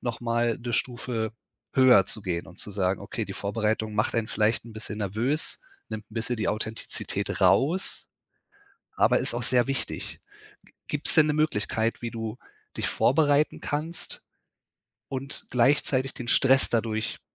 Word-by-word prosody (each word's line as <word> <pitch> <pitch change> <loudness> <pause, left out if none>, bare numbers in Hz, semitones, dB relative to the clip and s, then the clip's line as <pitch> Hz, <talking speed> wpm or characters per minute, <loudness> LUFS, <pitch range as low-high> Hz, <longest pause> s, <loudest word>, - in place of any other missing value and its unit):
noch 120 -1 -3
mal 120 -1 +1
'ne 120 -1 -5
Stufe 115 -2 -2 0.4
höher 125 -7 +6
zu 110 - -2
gehen 85 -3 -2
und 95 - -14
zu 105 - -4
sagen: 95 -1 0
„Okay, - - -4
die - - -7
Vorbereitung 110 +1 -1
macht 105 +3 +1
einen 115 -2 0
vielleicht 110 +1 +1
'n 115 - -11
bisschen 110 0 -6
nervös, 115 - -1 0.3
nimmt 110 0 -5
'n - - -14
bisschen 115 +2 -1
die 110 - -1
Authentizität 110 +1 -2
raus, 165 +8 +2 0.8
aber - - +4
ist - - -1
auch 120 - -2
sehr 125 +1 +3
wichtig.“ 135 0 -3 0.7
G 150 - -1
gibt's 145 - +1
denn 155 - +7
'ne 150 - +1
Möglichkeit, 115 -7 0
wie 115 - -3
du 115 +1 -5 0.4
dich - - 0
vorbereiten 145 +2 +3
kannst 155 +4 -2 0.9
und 135 +1 -5
gleichzeitig 130 +1 +2
den 120 - -7
Stress 135 +1 +4
dadurch 110 -1 -1
115 Hz, 155 wpm, -27 LUFS, 110-130 Hz, 0.9 s, denn